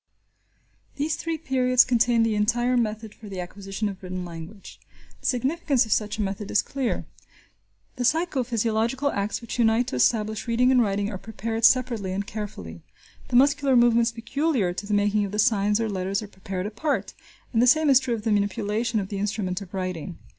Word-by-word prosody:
These 300 +2 -1
three 330 +1 -3
periods 255 -4 +3
contain 240 -1 +3
the 225 -1 +1
entire 240 +4 +1
method 220 -2 -2
for 215 - -12
the 190 -2 -6
acquisition 195 +3 -4
of 195 -2 -6
written 185 -1 -5
language. 170 +4 -10 0.4
The - - -4
significance 270 +1 +1
of 220 - -8
such 210 0 0
a 215 - 0
method 195 +1 -4
is - - +2
clear. 270 -3 -2 0.9
The 250 - -1
psycho 315 -1 +1
physiological 235 +4 0
acts 200 +4 -2
which 235 +1 -6
unite 225 +1 +3
to - - -4
establish 215 - +1
reading 245 +2 +3
and 255 -2 +5
writing 205 -1 0
are 190 - -6
prepared 225 +1 -2
separately 235 -8 +2
and 200 +1 -2
carefully. 145 - -7 0.5
The 245 - -3
muscular 280 +1 +4
movements 235 -1 +4
peculiar 230 - -1
to 200 +3 -6
the 205 - +1
making 205 +1 +2
of 195 - -6
the - - -2
signs 210 -1 +2
or 225 - 0
letters 195 0 -2
are - - -8
prepared 190 -1 -6
apart, 230 +9 -2 0.4
and 225 - +3
the 250 - +4
same 310 +5 +5
is 270 -3 +7
true 255 -3 -2
of 215 - -7
the 220 - 0
manipulation 210 +2 0
of 195 -1 -4
the 200 - -4
instrument 200 -2 -2
of 190 -2 -10
writing. 185 -2 -4
220 Hz, 190 wpm, -25 LUFS, 200-245 Hz, 0.9 s, is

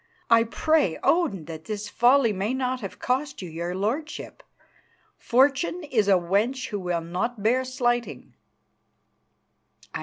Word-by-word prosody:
I 230 0 +6
pray 300 - +1
Odin 295 - +1
that 160 -1 -9
this 210 -1 -4
folly 240 +1 +3
may 205 +6 -2
not 255 -1 -2
have 195 - -7
cost 265 -2 -2
you - - -6
your 170 +2 -4
lordship. 250 +12 -4 0.8
Fortune 275 +7 +2
is 235 -9 0
a 200 - +5
wench 210 +9 0
who 205 - -3
will 175 -2 -2
not 185 +7 -3
bear 250 +4 +2
slighting." 240 -2 -2
230 Hz, 130 wpm, -25 LUFS, 195-260 Hz, 0.8 s, I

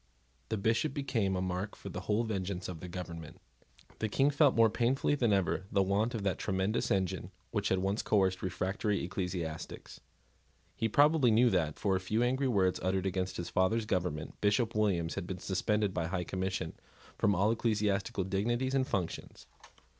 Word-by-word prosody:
The 110 - -1
Bishop 115 +7 +1
became 115 -9 0
a 90 - -1
mark 95 +2 -3
for - - -8
the - - -5
whole 105 +2 0
vengeance 95 -4 -3
of 90 -3 -6
the 90 - -7
government. 85 -3 -7 0.6
The 110 - -1
King 135 +7 +3
felt 145 -1 +4
more 115 -1 +6
painfully 130 +5 +1
than 120 -6 +2
ever 95 -1 +1
the 100 -1 +3
want 105 +5 +1
of 105 - -3
that 95 -2 0
tremendous 95 +2 0
engine 95 -1 0 0.2
which 105 -4 0
had 95 - +2
once 95 +3 0
coerced 95 -3 +2
refractory 95 +3 -1
ecclesiastics. 90 -3 -5 0.8
He 115 - 0
probably 145 +1 +5
knew 115 +2 +5
that, 80 -5 0
for 95 -2 +1
a - - +1
few 105 +5 0
angry 130 +2 +1
words 95 -6 +2
uttered 95 0 0
against 95 -1 -2
his 85 0 -4
father's 105 +6 +1
government, 90 -7 -2
Bishop 105 +3 +2
Williams 95 -6 +1
had 85 - -4
been 95 - -4
suspended 100 +2 0
by 85 -3 -1
the - - -4
High 90 -1 -1
Commission 95 -2 -3 0.5
from 100 - +3
all 100 +5 +3
ecclesiastical 105 -4 0
dignities 120 +7 0
and 130 -1 +2
functions. 90 - -4
100 Hz, 180 wpm, -32 LUFS, 95-115 Hz, 0.8 s, more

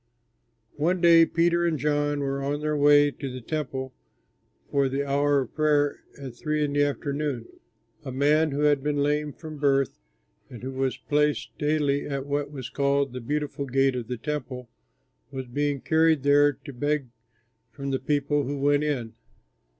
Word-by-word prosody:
One 175 +5 +1
day 165 -1 +6
Peter 170 0 +2
and 170 -2 +1
John 145 0 0
were 140 0 -2
on 140 +1 -2
their 150 0 -1
way 145 0 +5
to 135 -1 -6
the 130 - -6
Temple 130 -1 -4 0.8
for 140 -1 +2
the 140 +2 -2
hour 140 0 +2
of 130 - -7
prayer 150 -2 +2 0.2
at 135 -3 -7
three 150 +4 -1
in 145 - -3
the 145 - +2
afternoon. 140 -3 -2 0.6
A 135 - -6
man 150 +4 +3
who 145 +1 -2
had 145 -2 +3
been 145 0 0
lame 150 +1 0
from 155 0 -10
birth, 140 -2 +1 0.5
and 120 -1 -11
who 130 - -4
was 130 0 -1
placed 150 0 0
daily 150 -2 +1
at 140 -2 -3
what 145 0 -2
was 135 -5 -7
called 140 -1 +1
the 125 - -5
Beautiful 145 +2 -3
Gate 135 0 +2
of 120 -3 -4
the 125 - -4
Temple, 125 -2 -5 0.6
was 135 -1 -6
being 145 +2 -2
carried 160 -2 +3
there 145 +1 +5
to 140 +2 -11
beg 145 0 -1 0.6
from 140 +4 -5
the 135 - 0
people 145 +1 0
who 145 +1 -3
went 145 +1 +2
in. 125 -7 -2
145 Hz, 175 wpm, -26 LUFS, 135-150 Hz, 0.8 s, day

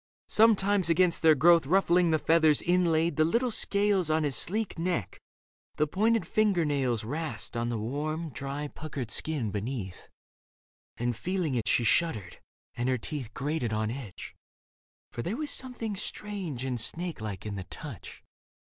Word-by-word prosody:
Sometimes 205 -4 +4
against 170 +1 +3
their 160 -1 +6
growth 165 +1 +5
Ruffling 180 0 +3
the 160 - +3
feathers 160 -1 +3
inlaid 170 -2 +2
like 155 - +5
little 245 +1 +1
scales 200 -5 +2
On 155 0 +2
his 145 -3 0
sleek 210 -2 -1
neck, 170 - -2 0.6
the 150 - +2
pointed 220 +8 +1
finger 205 -6 +2
nails 130 -6 0
Rasped 130 -2 -4
on 120 0 -1
the 120 - -2
warm, 150 +8 -3
dry, 140 +4 -4
puckered 140 -6 -6
skin 140 -10 -1
beneath; 105 -3 -5 0.9
And 120 0 -1
feeling 180 - -2
it 115 -4 -1
she 120 - +3
shuddered, 110 - 0 0.3
and 120 +2 -2
her 130 - +2
teeth 125 -1 -5
Grated 140 -4 -2
on 110 0 -1
edge; 120 -8 -8 0.8
for - - -5
there 195 - -3
was 305 -1 -2
something 240 -5 -4
strange 190 - -4
And 125 -3 -1
snake 170 +4 -2
like 105 -3 -5
in 105 - -4
the 95 -2 -5
touch. - - -9
155 Hz, 155 wpm, -29 LUFS, 120-180 Hz, 0.9 s, their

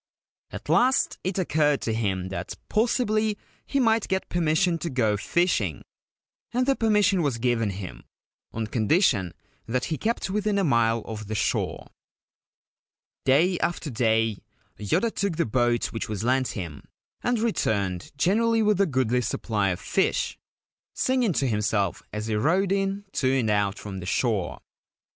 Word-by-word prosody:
At - - -9
last 260 +2 +3
it 190 +1 -2
occurred 150 -5 +2
to 115 - -1
him 95 -5 -1
that 95 - -5
possibly 215 -2 +1 0.3
he 275 - 0
might 225 -3 +2
get 190 0 -2
permission 170 +1 +1
to 170 - -3
go 115 -6 +1
fishing; 105 - 0 0.7
and 250 +1 +1
the 275 0 +3
permission 210 -5 +3
was 140 -6 0
given 115 -2 +1
him, 95 -2 -7 0.5
on 110 0 -3
condition 110 - +2 0.4
that 125 +2 -1
he - - -3
kept 225 -3 -1
within 210 0 0
a 200 - +2
mile 115 - +2
of 110 -2 -7
the 110 - -3
shore. 105 - -1 1.4
Day 165 +7 +3
after 165 -3 -2
day 115 -3 +1 0.4
Yoda 165 - +1
took 200 -5 -1
the 170 - +1
boat 120 +1 +1
which 115 0 -4
was 105 0 -3
lent 130 +2 +2
him, 85 -8 -6 0.4
and 245 0 +1
returned 100 - -1
generally 225 +8 +2
with 210 -2 +3
a 200 - +3
goodly 130 -4 +1
supply 105 -4 -1
of 90 - -2
fish, - - 0 0.6
singing 255 -6 +1
to 140 - 0
himself 105 -4 0
as 105 0 -4
he 110 - -2
rowed 175 - +2
in 195 +1 -1
to 130 -7 +1
and 125 -5 +1
out 100 -1 +1
from 95 -2 -7
the 90 - -7
shore. 105 -4 -1
130 Hz, 155 wpm, -25 LUFS, -, 1.4 s, last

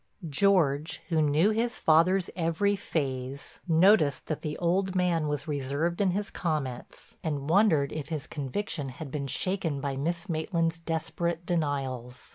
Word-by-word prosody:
George, 155 -3 +2
who 160 -2 +2
knew 155 +7 +3
his 235 +2 0
father's 175 +4 +3
every 175 +4 +1
phase, 135 -6 -4
noticed 165 -4 +4
that 155 - -3
the 150 -1 -4
old 185 +2 0
man 175 -4 +2
was 150 +1 -3
reserved 145 +5 -1
in 195 - +3
his 200 +3 -2
comments, 150 -8 -4
and 145 -1 -2
wondered 165 -8 +4
if 155 -1 -5
his 155 -4 -3
conviction 145 +1 -3
had 135 +2 -8
been 140 -1 -3
shaken 170 -1 -1
by 140 -1 -2
Miss 165 +6 -2
Maitland's 165 0 -1
desperate 165 +1 -2
denials. 135 -7 -2
160 Hz, 145 wpm, -28 LUFS, 140-175 Hz, -, noticed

